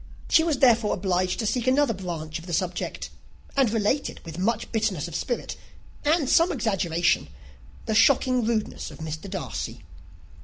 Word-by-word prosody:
She 320 - +5
was 320 -4 +1
therefore 230 -5 +4
obliged 185 -1 0
to 225 - -2
seek 240 +3 -1
another 260 -1 +3
branch 165 -4 -5
of 165 - -13
the 175 - -5
subject, 180 +1 -2 0.4
and 270 -4 +4
related, 225 +6 0
with 165 +1 -7
much 225 +4 -1
bitterness 195 -8 0
of 170 - -9
spirit, 240 +5 -3 0.5
and 300 -1 +2
some 335 +7 +4
exaggeration, 175 - +1 0.6
the 220 - -1
shocking 255 +1 +4
rudeness 220 -1 -2
of - - -11
Mr. 160 +3 -6
Darcy. 190 - -5
215 Hz, 155 wpm, -25 LUFS, 180-255 Hz, 0.6 s, She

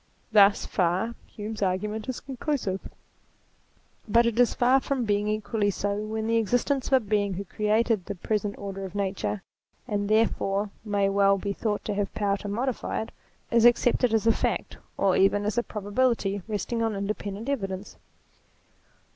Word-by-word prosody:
Thus 205 -1 +5
far 185 +5 0
Hume's 215 +1 -7
argument 210 +4 -1
is 255 - -4
conclusive. 260 -7 -2 1.3
But 235 +2 +4
it 235 0 0
is 245 - +4
far 255 +2 +4
from 265 -2 -2
being 205 0 +1
equally 215 0 0
so 200 +1 -1
when 220 +1 -3
the 230 +1 +2
existence 245 +5 +1
of - - -2
a 265 - +7
Being 205 -2 0
who 195 - -4
created 215 0 +1
the 200 - -5
present 205 +2 -2
order 195 -1 -6
of 190 0 -7
Nature, 195 0 -2 0.4
and, 205 -3 -1
therefore, 210 -2 +1
may 205 -2 +1
well 195 0 +4
be 200 +1 -3
thought 210 0 -2
to 210 - -1
have 200 -1 -1
power 200 -1 +1
to 205 - -7
modify 235 +3 -2
it, - - -11 0.4
is 235 -1 +4
accepted 240 0 +4
as 225 -1 +1
a 225 - +6
fact, - - -2 0.2
or 195 -2 +3
even 205 +1 +3
as 210 +2 +1
a - - +2
probability 210 -2 0
resting 225 +2 -2
on 225 -2 0
independent 200 +2 -4
evidence. 195 -8 -3
210 Hz, 165 wpm, -27 LUFS, 200-230 Hz, 1.3 s, a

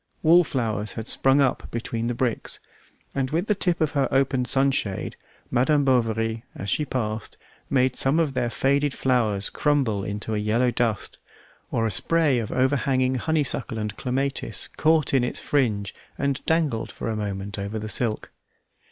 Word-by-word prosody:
Wallflowers 125 - +2
had 110 +1 -6
sprung 135 +1 +3
up 135 -2 0
between 115 0 -3
the 120 - -1
bricks, 120 -1 -2 0.5
and 135 -1 -1
with 165 +6 0
the 215 - +2
tip 180 -3 0
of 155 -1 +1
her 140 -3 +1
open 135 -1 +1
sunshade 135 -7 +1 0.4
Madame 140 +4 +3
Bovary, 115 -3 +1
as 100 -1 -4
she 150 - +1
passed, 110 -6 -3 0.3
made 130 -1 +2
some 135 +5 +2
of 155 -5 +1
their 125 -2 0
faded 140 +3 +1
flowers 110 -6 +1
crumble 135 -9 +1
into 105 +2 -2
a 105 - 0
yellow 115 +4 +1
dust, 115 -3 -1 0.5
or 115 - 0
a 110 - 0
spray 150 - +2
of 110 - -4
overhanging 130 0 +1
honeysuckle 140 -3 0
and 105 -1 -3
clematis 135 +2 -1
caught 155 -2 +2
in 130 -2 +4
its 125 - 0
fringe 105 -9 0 0.2
and 140 0 -1
dangled 160 -8 +1
for - - -6
a 110 - -1
moment 100 -1 -4
over 100 +2 -4
the 110 0 -5
silk. 110 +1 -1
125 Hz, 160 wpm, -24 LUFS, 110-140 Hz, 0.5 s, in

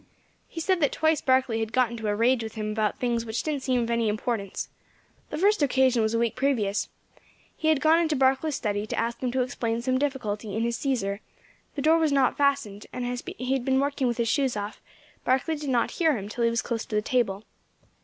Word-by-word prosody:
He 330 - -7
said 370 +2 +1
that 285 - +3
twice 315 -1 +1
Barkley 260 -3 +2
had 225 -1 -2
got 250 -1 +2
into 225 -2 -4
a 205 - +1
rage 235 +3 +3
with 220 0 -6
him 215 -1 -3
about 215 -1 0
things 240 -2 0
which 220 0 -3
didn't 300 -3 -2
seem 255 -2 +1
of 230 - -2
any 230 -2 +1
importance. 210 -2 -2 0.6
The 300 - -4
first 405 +2 +3
occasion 260 -3 +3
was 220 +1 +1
a - - +3
week 230 -1 0
previous. 225 -7 0 0.7
He 315 - -2
had 310 -3 +3
gone 320 +1 +5
into 320 -3 +1
Barkley's 270 +3 +2
study 205 -3 -2
to - - -4
ask 235 +1 -2
him 250 -2 -1
to 260 -1 +2
explain 230 -2 -2
some 255 0 +1
difficulty 220 -7 -2
in 225 - 0
his 235 0 -1
Cæsar; 210 -8 -1 0.6
the 280 - -3
door 320 +2 +5
was 315 -2 +2
not 275 -2 +3
fastened, 275 -8 0
and 250 -1 -4
as 245 0 -3 0.2
he 255 +1 -1
had 265 -2 0
been 265 0 +2
working 280 -1 0
with 240 -1 -1
his 235 -1 0
shoes 265 -2 +1
off, 205 +1 -5 0.4
Barkley 265 +5 +1
did 295 -2 -5
not 245 -2 +1
hear 320 -6 +2
him 200 -1 -6
till 235 +2 -1
he - - +4
was 230 0 -1
close 235 -2 -2
to 215 - -5
the 210 - +1
table. 215 -5 0
245 Hz, 235 wpm, -26 LUFS, 225-275 Hz, 0.7 s, gone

